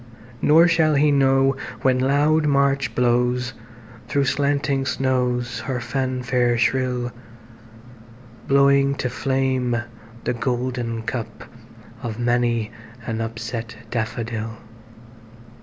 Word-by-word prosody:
Nor 165 +3 +6
shall 160 -2 +3
he 145 +1 +4
know 135 -1 +3 0.3
when 130 -1 +3
loud 145 +4 +2
March 140 -4 +1
blowsThro' 120 0 -1
slanting 140 +1 0
snows 125 -2 -1
her 130 +1 -3
fanfare 125 -1 0
shrill, 125 0 0 1.4
Blowing 140 0 +4
to 125 -2 -3
flame 130 -3 0 0.4
the - - 0
golden 120 -1 -2
cupOf 115 -1 -8
many 120 -2 0 0.3
an 115 -1 -3
upset 115 +1 -5 0.2
daffodil. 115 -1 -3
125 Hz, 90 wpm, -22 LUFS, 120-135 Hz, 1.4 s, Nor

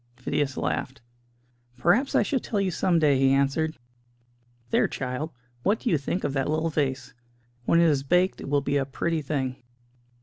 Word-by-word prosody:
Phidias 135 +2 -2
laughed. 130 0 -3 0.7
"Perhaps 205 - +2
I - - +5
shall 275 - 0
tell 215 -3 -2
you 195 -2 0
some 175 0 +1
day," 145 -4 +3
he 135 0 +4
answered. 140 +4 +1 0.9
"There, - - +3
child, 130 +4 -4 0.3
what 205 - +1
do 245 - 0
you 160 - +4
think 160 +6 -3
of - - -1
that 135 0 0
little 160 +1 0
vase? 135 -3 -2 0.5
When 170 - +4
it - - +5
is 145 -4 +3
baked 180 +7 +1
it - - -6
will 145 0 +2
be 140 +1 0
a 135 - 0
pretty 160 +3 -1
thing." 135 -3 -2
145 Hz, 180 wpm, -26 LUFS, 135-170 Hz, 0.9 s, I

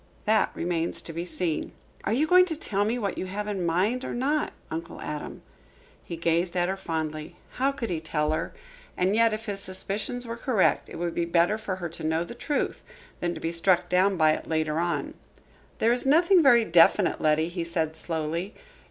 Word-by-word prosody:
"That 220 +1 +3
remains 170 -1 -2
to 165 - -7
be 170 +2 -4
seen." 165 -1 -2 0.3
"Are - - 0
you 265 +7 +2
going 365 +3 +6
to 325 - -2
tell 205 -9 -1
me 230 +3 0
what 205 -5 -2
you 185 - -3
have 205 +3 -4
in 205 -1 -2
your 180 - -2
mind 200 +10 +1
or - - -4
not, 285 +5 0 0.2
Uncle 165 +1 -5
Adam?" 150 -1 -6 0.6
He 170 - -6
gazed 170 +2 0
at 175 0 +2
her 190 - -1
fondly. 160 -2 -4 0.2
How 270 +2 +2
could 255 -7 -4
he 165 - -1
tell 155 -1 -1
her? 155 - -2 0.5
And 185 +3 +2
yet, 230 0 +4
if 215 +1 -4
his 200 -3 -3
suspicions 200 +6 -4
were 230 0 -5
correct, 235 -5 +1
it - - -9
would 170 0 -2
be 170 - 0
better 170 +4 +3
for 200 -4 -3
her 175 -2 -5
to 165 - -7
know 160 +1 +1
the 175 - -8
truth 285 +4 -2
now 175 - -8
than 175 - -2
to - - -6
be 165 - -1
struck 170 +1 +2
down 185 +2 +3
by 155 -1 +5
it - - -3
later 155 -1 0
on. 170 0 -1 0.6
"There 230 +1 +3
is 245 - +1
nothing 340 +6 +5
very 240 -6 +6
definite, 170 +2 +4
Letty," 155 +1 +3
he 175 -1 -3
said 160 -2 -2
slowly. 165 +4 -3
180 Hz, 215 wpm, -26 LUFS, 165-220 Hz, 0.6 s, going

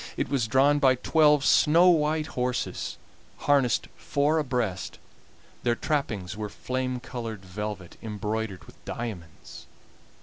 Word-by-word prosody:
It - - -1
was 130 -5 0
drawn 135 +5 +4
by 130 -3 +5
twelve 150 +2 +3
snow 170 +4 +6
white 155 -2 +2
horses, 125 0 -2 0.4
harnessed 135 -5 +2
four 145 +3 +1
abreast; 120 -10 -2 0.6
their 120 -1 +1
trappings 110 -11 -2
were 105 0 -4
flame 130 +2 -3
colored 115 -5 -6
velvet, 95 -1 -6
embroidered 105 -2 -4
with - - -18
diamonds. 95 -9 -7
125 Hz, 115 wpm, -27 LUFS, 105-145 Hz, 0.6 s, snow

